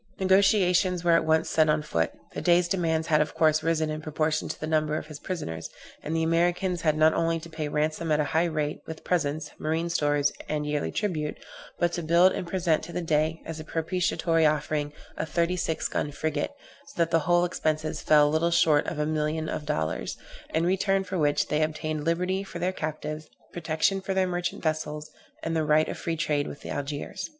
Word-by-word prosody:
Negociations 190 -2 +3
were 175 - +3
at 165 -1 +4
once 160 0 +2
set 155 -1 +3
on 150 0 +2
foot; 80 - 0 0.2
the - - -4
Dey's 175 0 +4
demands 165 -4 0
had 155 -1 +4
of 150 - -2
course 155 -1 +3
risen 160 -1 0
in 155 0 -4
proportion 155 0 -1
to - - -5
the - - -3
number 155 -1 +1
of - - -5
his 150 -1 -9
prisoners, 80 - -5 0.3
and 160 - -3
the 165 - +1
Americans 175 +2 +1
had 155 -2 +2
not 155 +1 +5
only 165 0 +1
to 165 +1 -11
pay 155 -1 -3
ransom 155 +2 -1
at 150 - +3
a - - +3
high 165 +2 +3
rate, 155 -3 -2
with 160 -1 -8
presents, 155 -3 -1
marine 160 +2 -1
stores, 145 -3 +1 0.2
and 150 -1 -1
yearly 150 0 -1
tribute, 160 -8 -2 0.4
but 175 0 +1
to 175 - -2
build 170 +3 +5
and 180 - -4
present 170 -3 +1
to 170 - -8
the - - -3
Dey, 160 0 0
as 165 -1 -6
a - - -6
propitiatory 165 0 0
offering, 150 -1 +1 0.3
a - - -1
thirty 170 +3 +1
six 165 -3 -1
gun 145 - -2
frigate; 150 0 -2 0.4
so 280 - -13
that 170 -1 +1
the 165 - +4
whole 175 0 +5
expenses 155 -2 -2
fell 150 -1 +5
little 160 +3 +2
short 160 -3 +3
of 160 - -3
a 150 - 0
million 155 +1 -1
of 150 - -4
dollars, 70 -6 -2 0.3
in 160 +1 +1
return 195 +1 +2
for 190 -1 -3
which 145 -1 +2
they 150 +1 +1
obtained 155 0 -2
liberty 180 +4 0
for 195 - -8
their 180 +2 -1
captives, 155 -1 -5 0.2
protection 170 +3 0
for 190 0 -3
their 190 -1 +3
merchant 175 0 -3
vessels, 155 -1 -2 0.3
and 165 0 -2
the 160 - +1
right 155 +1 +3
of - - -4
free 165 -1 -3
trade 150 -3 0
with - - -9
Algiers. 145 - -4
160 Hz, 210 wpm, -27 LUFS, 150-170 Hz, 0.4 s, not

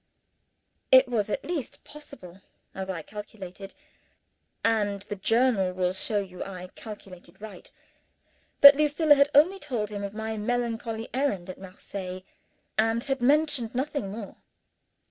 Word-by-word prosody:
It 260 0 +8
was 220 -4 -1
at - - -3
least 325 -7 -5
possible, 195 -11 -13 0.3
as 190 0 -6
I 170 -4 -4
calculated 195 -1 -9 0.9
and 205 -3 +1
the 205 - -6
Journal 220 -2 +2
will 180 0 0
show 205 +2 0
you 185 -2 -6
I 185 -1 -8
calculated 195 -5 -11
right 205 -4 -11 0.9
that 280 0 +12
Lucilla 300 +1 +4
had 280 0 +4
only 355 +7 +5
told 235 - -3
him 205 -1 -5
of 200 +1 -6
my 220 0 -4
melancholy 230 0 -2
errand 210 -10 -1
at - - -14
Marseilles, 185 -1 -8 0.6
and 225 +1 +2
had 270 -2 -2
mentioned 280 -3 +2
nothing 265 -5 -2
more. 205 0 -8
220 Hz, 135 wpm, -27 LUFS, 195-260 Hz, 0.9 s, that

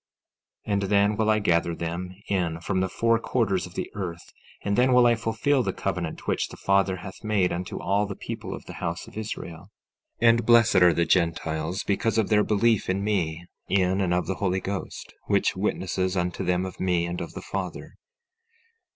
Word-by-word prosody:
16:5 105 - 0
And 100 - +1
then 100 +1 +3
will 110 0 +1
I 110 - +4
gather 85 -4 +1
them 85 +3 -4
in 85 -4 -1
from 95 +2 -1
the 95 0 0
four 115 +4 +2
quarters 100 -8 0
of 90 - -16
the - - -4
earth; 90 -4 -6 0.3
and 100 0 0
then 125 +2 +4
will 125 -1 +6
I 120 - +6
fulfill 115 +5 +1
the 95 -5 -1
covenant 90 -4 -3
which - - 0
the - - -12
Father 95 -1 +2
hath 95 +3 -10
made 105 -4 +1
unto 90 +2 -4
all 100 +2 +1
the 100 - -5
people - - -6
of - - -11
the - - -9
house 85 0 -3
of - - -14
Israel. 105 -6 -6 0.5
16:6 120 - +4
And 115 0 +3
blessed 115 -2 +6
are 90 -2 +6
the 85 - +1
Gentiles, 85 0 0
because 105 +2 0
of 110 - +2
their 105 -1 +4
belief 110 0 +2
in 95 +1 0
me, 85 -5 -1 0.2
in 95 0 +2
and 90 -2 0
of 90 0 +1
the 95 - -1
Holy 95 -1 +1
Ghost, 95 0 -5
which - - +2
witnesses 95 0 -1
unto 90 +1 -1
them 90 0 +1
of 95 - -8
me 90 -2 +1
and 85 +1 -4
of - - -6
the - - -7
Father. - - -5
95 Hz, 205 wpm, -26 LUFS, 90-105 Hz, 0.5 s, will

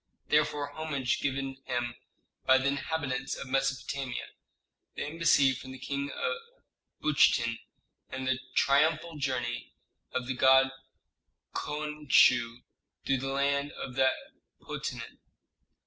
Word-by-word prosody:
therefore 150 -1 +2
homage 140 -6 -1
given 135 -1 -2
him 120 -1 -2 0.5
by 130 - +6
the 130 - -1
inhabitants 135 -2 -2
of - - -6
Mesopotamia, 135 -1 -2 0.7
the - - -3
embassy 145 -3 +4
from 130 0 -8
the 130 - -8
King 140 +2 -3
of 470 - -2 0.7
Buchten, 120 -6 +3 0.5
and 130 0 -4
the 130 -1 +1 0.2
triumphal 155 +4 +3
journey 125 -3 -2 0.4
of 125 -1 -2
the 130 - -2
god 130 +1 +5 0.8
Khonsu 150 -5 +2 0.4
through 135 - +2
the 135 - -4
land 140 +1 0
of 130 - -6
that 130 0 +4 0.5
potentate. - - -6
135 Hz, 115 wpm, -30 LUFS, 130-145 Hz, 0.8 s, by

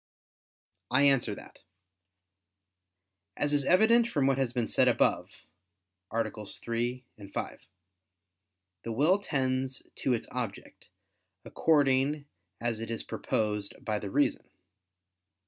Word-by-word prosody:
I 130 +3 +3
answer 135 -7 +3
that, - - -13 1.8
As 145 0 +1
is 145 -1 +3
evident 230 +7 +5
from 145 - 0
what 135 0 +2
has 130 -3 +1
been 120 -2 -1
said - - +3
above - - +2 0.8
(AA. 115 +1 +1 0.2
3, 120 +4 -3 0.3
5), - - -5 1.1
the 115 - -5
will 155 - +3
tends 130 -6 -1
to 130 - +1
its 115 - -2
object, 120 -6 -6 0.6
according 145 -1 +2 0.3
as 115 -2 -1
it 115 - -5
is 115 - -3
proposed 105 -2 -2
by 105 -2 0
the 100 - -5
reason. - - 0
130 Hz, 110 wpm, -29 LUFS, 115-145 Hz, 1.8 s, evident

